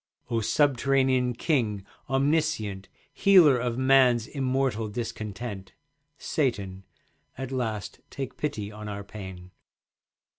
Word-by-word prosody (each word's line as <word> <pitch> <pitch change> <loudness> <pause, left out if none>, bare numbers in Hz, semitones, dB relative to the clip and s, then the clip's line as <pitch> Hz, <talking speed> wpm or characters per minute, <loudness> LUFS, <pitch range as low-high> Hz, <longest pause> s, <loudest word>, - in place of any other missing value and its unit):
O 115 -1 +1
subterranean 130 0 +2
King, 115 - 0 0.2
omniscient, 135 -8 0 0.2
Healer 170 -10 +6
of 120 0 -2
man's 130 -3 +4
immortal 130 -5 -1
discontent, 105 -2 -6 0.4
Satan, 100 -9 -2 0.5
at 130 0 -5
last 110 -6 -3
take 135 -2 -6
pity 110 -9 -3
on 105 0 -8
our 100 0 -5
pain. 95 -3 -9
120 Hz, 100 wpm, -27 LUFS, 105-135 Hz, 0.5 s, Healer